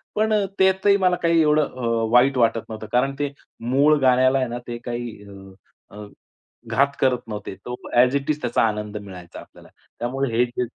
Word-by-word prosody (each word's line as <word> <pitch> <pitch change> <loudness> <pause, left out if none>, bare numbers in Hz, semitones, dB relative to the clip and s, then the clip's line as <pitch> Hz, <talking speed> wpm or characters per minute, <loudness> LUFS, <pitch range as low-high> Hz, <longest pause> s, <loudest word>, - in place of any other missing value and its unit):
पण 215 +1 +1 0.3
त्यातही 190 +1 +4
मला 185 -2 +2
काही 165 -1 +4
एवढं 150 0 +3
अ, 115 -3 -2
वाईट 130 +3 +4
वाटत 115 -1 +2
नव्हतं 110 -1 -7
कारण 130 +3 +1
ते 145 -1 -1 0.4
मूळ 150 +3 +4
गाण्याला 130 +1 +4
आहे 130 - 0
ना 120 - -4
ते 120 -1 -5
काही 120 0 -4 0.2
अ, - - -12 0.6
अ, 105 0 -8 0.7
घात 140 - +3
करत 125 -2 0
नव्हते. 105 -3 -6
तो 125 +4 -7 0.2
ॲज 125 +2 +4
इट 140 +1 -2
इज 150 0 -4
त्याचा 120 -1 +1
आनंद 105 -1 -4
मिळायचा 95 -4 -10
आपल्याला, - - -16 0.3
त्यामुळे 130 +2 -2
हे 120 - +4
जे 125 +1 -3
125 Hz, 185 wpm, -22 LUFS, 115-140 Hz, 0.7 s, त्यातही